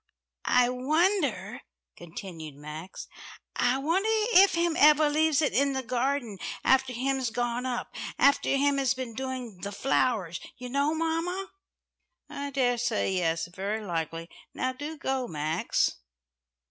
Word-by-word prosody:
"I 250 0 +5
wonder," 310 +11 0 0.3
continued 165 -3 -9
Max, 150 +5 -8 0.5
"I 245 +2 +2
wonder 340 +10 +1 0.2
if 385 -1 +7
Him 340 -1 +1
ever 300 0 +6
leaves 315 0 +3
it 295 - +1
in 280 +1 +2
the 265 0 -2
garden 250 -4 -1 0.2
after 265 -1 +3
Him's 260 +1 -1
gone 240 +2 -2
up 245 -1 -4 0.2
after 280 - +4
Him 275 0 +2
has 265 -3 +2
been 255 -3 -5
doing 255 -5 -5
the 200 +2 -4
flowers, 205 -6 0 0.2
you 250 -1 -7
know, 280 +4 +1
mamma." 330 +4 -2 0.8
"I 280 0 -4
daresay 245 -6 +1
yes, 165 -3 0
very 200 +5 -4
likely. 165 -2 -3 0.3
Now 255 0 -1
do 295 +4 -6
go, 265 -3 -2
Max." 155 0 0
255 Hz, 135 wpm, -28 LUFS, 205-285 Hz, 0.8 s, if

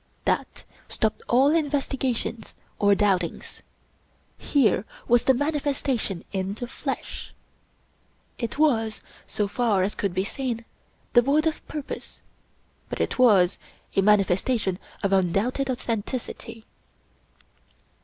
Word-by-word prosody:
That - - -1 0.3
stopped 220 -1 0
all 270 +5 +5
investigations 270 -7 -1 0.2
or 205 -1 +5
doubtings. 190 -4 0 0.8
Here 225 -9 +2 0.2
was 240 0 +4
the 265 - +6
manifesta 285 -2 0
tion 195 -5 -3
in 195 0 -2
the 245 - -5
flesh. - - -5 1.0
It 235 +1 -3
was, 225 -8 +2 0.3
so 210 - -1
far 205 -3 +1
as 200 - -1
could 195 -3 -2
be 190 - +1
seen, 235 +1 -3 0.5
devoid 275 +6 +4
of 320 -1 -1
purpose, 300 -3 -7 0.7
but - - -4
it - - -1
was 200 -8 +5 0.4
a 195 - +4
manifestation 200 0 +2 0.2
of 200 -1 +2
undoubted 195 +9 +1
authen 235 -4 -1
ticity. 230 -2 -6
230 Hz, 115 wpm, -25 LUFS, 200-265 Hz, 1.0 s, the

